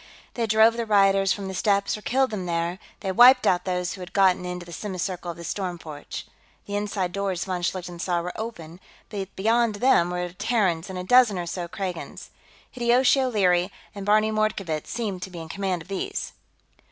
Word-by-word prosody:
They 230 -2 -1
drove 220 +2 +5
the 230 -1 -2
rioters 195 -2 +4
from 200 -2 -2
the 190 - -5
steps 200 +1 +1
or 215 - -9
killed 260 +3 +1
them 190 -4 -4
there, 170 +2 -1 0.2
they 195 - -2
wiped 250 +6 +7
out 180 0 +2
those 180 -1 -1
who 190 - -9
had 180 - -9
gotten 190 -2 +3
into 180 -1 -5
the 170 - -10
semicircle 185 -3 -4
of 170 - -6
the 170 - -9
storm 180 0 -3
porch. 155 -3 -8 0.4
The 205 - -5
inside 205 -3 -2
doors, 190 -3 -2
von 185 -2 -3
Schlichten 175 -1 -3
saw, 175 -2 0
were 180 +1 -4
open, 175 -7 -7 0.3
but 195 -2 -6
beyond 225 +2 +2
them 205 -6 +3
were 180 0 -3
Terrans 195 -5 0
and 190 - -5
a 180 - -4
dozen 240 -1 +5
or 175 - -3
so 175 0 -4
Kragans. 180 -1 -6 0.4
Hideyoshi 250 +2 +3
O'Leary 190 -7 +2 0.2
and 200 -2 -7
Barney 215 +2 +3
Mordkovitz 210 -8 -1
seemed 210 -6 -3
to 190 - -5
be 180 - -10
in 160 -1 -8
command 190 -2 -2
of - - -22
these. 195 0 -4
190 Hz, 200 wpm, -25 LUFS, 180-215 Hz, 0.4 s, wiped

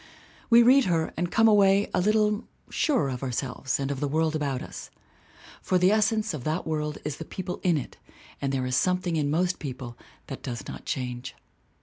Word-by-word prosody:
We 235 0 +7
read 260 +2 +6
her 165 -3 0
and 175 +1 -1
come 225 0 +4
away 200 -1 +4
a 180 - +2
little 210 +2 +2 0.3
surer 265 - +1
of 125 -2 -5
ourselves 130 0 -2
and 135 0 -2
of 140 - -3
the 145 - -1
world 160 +2 0
about 140 -4 -2
us. - - -9 0.7
For 185 - +1
the 180 +2 +4
essence 215 -1 +2
of 145 -5 -5
that 155 +5 -2
world 150 -1 -2
is 150 -2 -3
the - - -6
people 180 +2 -6
in 175 -4 +2
it 140 - -6 0.4
and 135 -1 -1
there 130 -2 -1
is 125 0 -1
something 180 0 +1
in 150 -2 0
most 180 +4 0
people 130 -4 -6 0.3
that - - -7
does 120 -2 -6
not - - -8
change. 125 0 -4
160 Hz, 200 wpm, -26 LUFS, 135-195 Hz, 0.7 s, We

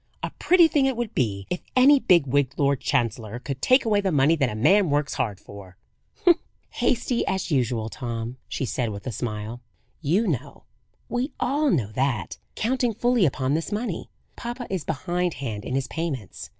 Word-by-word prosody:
A - - -2
pretty 350 -1 +6
thing 285 -4 +2
it 265 -3 -1
would 240 -3 -3
be 100 -6 -1
if 180 - -2
any 270 +3 +7
big 175 - +4
wigged 140 0 0
Lord 140 -2 +2
Chancellor 115 -4 -1
could 135 +1 -6
take 255 0 +4
away 210 -2 +3
the 195 -2 0
money 145 +2 +4
that 135 -5 +1
a 105 - -5
man 170 - +4
works 145 0 0
hard 105 -5 -2
for!" 95 -2 -12 0.9
"Hasty, 245 0 0
as 190 -2 -1
usual, 120 -5 +1
Tom," 115 0 -5
she 135 - -3
said 125 -1 -1
with 100 -1 -7
a 130 - -2
smile. 110 +1 -5 0.4
"You 175 +9 +2
know 140 - -3 0.4
we 250 +4 -2
all 285 +3 +1
know 120 - +1
that, 120 -6 -1 0.2
counting 245 -1 0
fully 240 -5 +3
upon 130 0 -1
this 165 +6 -2
money, 215 +4 -3 0.3
papa 240 +1 -5
is 185 -5 -2
behindhand 160 - -2
in 130 - -3
his 135 -1 -1
payments. 145 - -5
145 Hz, 175 wpm, -25 LUFS, -, 0.9 s, any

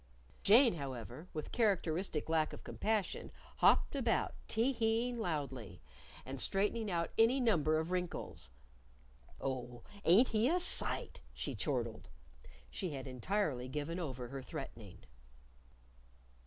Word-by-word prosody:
Jane, 235 +4 +6
however, 135 0 -7
with 155 - -6
characteristic 185 -7 0
lack 160 -1 +1
of - - -9
compassion, 215 -3 -2 0.3
hopped - - +4
about, 240 -5 0
tee 235 +5 +1
heeing 230 +1 0
loudly 135 - -4 0.5
and 135 0 -4
straightening 210 +3 0
out 170 -2 -1
any 235 +4 +5
number 160 - +2
of 160 +2 -2
wrinkles. 180 - -3 0.9
"Oh, 125 -3 -4 0.2
ain't 205 +10 +6
he 225 +3 +2
a 355 +3 +2
sight!" 360 - +5
she - - -4
chortled. - - -3 0.6
She 185 - -3
had 135 -4 -6
entirely 130 - -2
given 150 +6 -4
over 130 -7 -5
her 135 -1 -6
threatening. 110 -7 -9
170 Hz, 120 wpm, -35 LUFS, 135-220 Hz, 0.9 s, Jane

